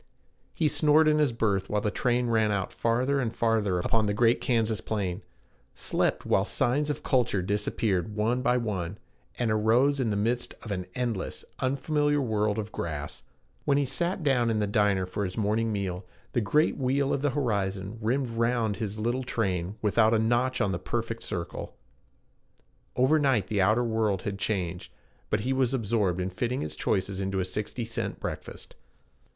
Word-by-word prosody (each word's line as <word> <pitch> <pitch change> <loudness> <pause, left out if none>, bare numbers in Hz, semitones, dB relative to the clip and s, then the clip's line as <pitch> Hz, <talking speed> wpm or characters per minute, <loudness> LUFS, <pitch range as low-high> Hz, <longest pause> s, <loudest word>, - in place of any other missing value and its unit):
He 155 - +2
snored 155 +1 +4
in 155 0 +4
his 150 -4 +3
berth 105 -4 0
while 105 - +1
the 105 0 -1
train 125 +1 +1
ran 110 -2 +2
out 100 -2 -2
farther 125 +5 +1
and 120 -4 -1
farther 110 -5 +1
upon 110 +4 +1
the 100 - 0
great 115 +2 +3
Kansas 115 -3 +1
plain; 100 -3 -2 0.5
slept - - 0
while - - +3
signs 145 +5 0
of 150 - -3
culture 120 -8 +1
disappeared 105 0 -1
one 115 +4 +1
by 125 0 +2
one, 100 -6 -3 0.4
and 120 -3 0
arose 120 +7 +3
in 125 -4 +1
the 105 - 0
midst 115 +4 -1
of 110 - -6
an 90 -2 -3
endless, 120 -6 -3
unfamiliar 145 +2 +1
world 105 -4 0
of 110 -1 -4
grass. 75 -3 -5 0.4
When 140 -1 +2
he 145 - +2
sat 175 +6 -1
down 125 -5 +3
in 110 - +1
the 105 - +1
diner 100 -2 +2
for 90 +3 -3
his 90 -2 -4
morning 110 +1 +1
meal, 95 -3 -3 0.3
the 120 - +2
great 150 +10 +2
wheel 135 +1 +1
of 135 - -1
the 145 - +2
horizon 100 -4 -1
rimmed 125 +4 0
round 115 -2 0
his 105 -1 -4
little 120 +4 0
train 95 -6 -1
without 110 +2 +4
a - - +4
notch 120 +4 +1
on 100 - +2
the 90 - -2
perfect 115 +4 -3
circle; 85 -1 -5 1.2
over 135 +5 +4
night 130 -9 +2
the 105 -2 +1
outer 110 +6 +3
world 110 -4 0
had 100 -1 -4
changed, 90 -2 -2 0.4
but 105 - +1
he 130 +4 0
was 130 -1 +1
absorbed 105 -6 0
in 90 +1 -2
fitting 120 +7 -2
his 75 - -4
choices 95 0 -1
into 95 0 -1
a 90 - 0
sixty 105 +5 -4
cent 110 - -4
breakfast. - - -6
110 Hz, 180 wpm, -28 LUFS, 100-125 Hz, 1.2 s, snored